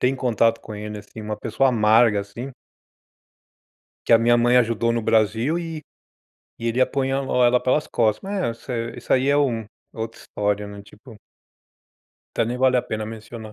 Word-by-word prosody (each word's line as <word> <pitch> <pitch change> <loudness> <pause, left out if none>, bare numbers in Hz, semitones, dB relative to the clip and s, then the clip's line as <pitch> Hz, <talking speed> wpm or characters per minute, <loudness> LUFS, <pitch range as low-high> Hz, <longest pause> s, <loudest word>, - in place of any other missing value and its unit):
tem 130 +2 +1
contato 115 -2 +1
com 110 - -9
ele, 105 0 -6
assim, 105 +2 -11
uma 105 0 -4
pessoa 115 +5 +1
amarga, 110 -1 +4
assim. 110 +7 -7 1.6
Que - - +3
a 115 - +8
minha 120 +1 +4
mãe 120 +1 +3
ajudou 115 -1 +2
no 115 0 -1
Brasil 115 - +1
e 165 -2 -6 0.8
e 115 - -3
ele 115 +2 -1
apunhalou 135 -1 +1
ela 120 +1 +4
pelas 130 +5 0
costas, 110 -3 +1
mas 190 - -4
é 115 -2 -2
isso - - -11
isso - - -1
aí 130 +2 +2
é 145 - +3
um 125 -6 +1
é 110 - -13 0.3
outra 115 0 -5
história, 105 0 -2
né, 100 0 -9
tipo 110 +3 -15 1.3
até - - +4
nem 120 +2 -3
vale 130 0 +3
a 125 - +2
pena 110 -1 -4
mencionar. 110 0 -9
115 Hz, 180 wpm, -23 LUFS, 110-130 Hz, 1.6 s, a